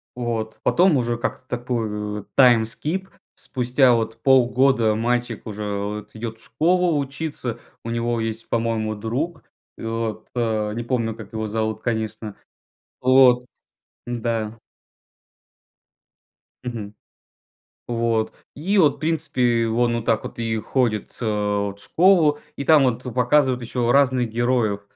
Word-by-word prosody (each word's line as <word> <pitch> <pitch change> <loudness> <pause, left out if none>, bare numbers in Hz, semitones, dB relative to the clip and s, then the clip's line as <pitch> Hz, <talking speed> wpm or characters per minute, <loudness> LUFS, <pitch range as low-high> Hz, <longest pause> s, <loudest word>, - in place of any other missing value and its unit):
Вот. 115 -3 -3
Потом 180 -3 +4
уже 120 -1 -1
как-то 130 +1 -4
такой, 110 -4 -3
э, - - -17
time 120 -4 +7
skip 155 +12 -4 0.3
спустя 125 0 +2
вот 115 -1 -1
полгода 130 -3 +4
мальчик 120 0 -1
уже 105 -1 -5
вот 105 +1 -5
идет 110 0 -6
в - - -18
школу 170 +5 +2
учиться. 140 -3 -4 0.2
У 115 - -5
него 115 0 -1
есть, 115 0 -4
по-моему, 115 -2 -1
друг 130 +10 -3 0.3
и - - -10
вот, 115 -1 -3
а, 110 -3 0
не 120 +2 -4
помню 115 -3 -1
как 110 -1 -11
его 110 0 -2
зовут 110 0 -2
конечно 110 -2 -3 0.7
вот. 130 -1 +5 0.6
Да. 115 -2 -2 2.1
Мгм. 110 -4 -6 0.9
Вот 115 -2 0 0.2
и 190 +8 0
вот 155 -6 +5
в - - -22
принципе 125 -7 +1
он 120 +1 +1
вот 115 - -5
так 115 -2 +1
вот - - -8
и 115 -1 -1
ходит 115 -3 -1
с - - -8
вот 105 -2 -1
в 100 - -10
школу, 160 - +4 0.2
и - - -4
там 150 -1 +6
вот 125 -1 0
показывают 130 0 +2
еще 120 0 0
разных 130 -3 +3
героев. 115 -3 0
120 Hz, 135 wpm, -22 LUFS, 110-130 Hz, 2.1 s, time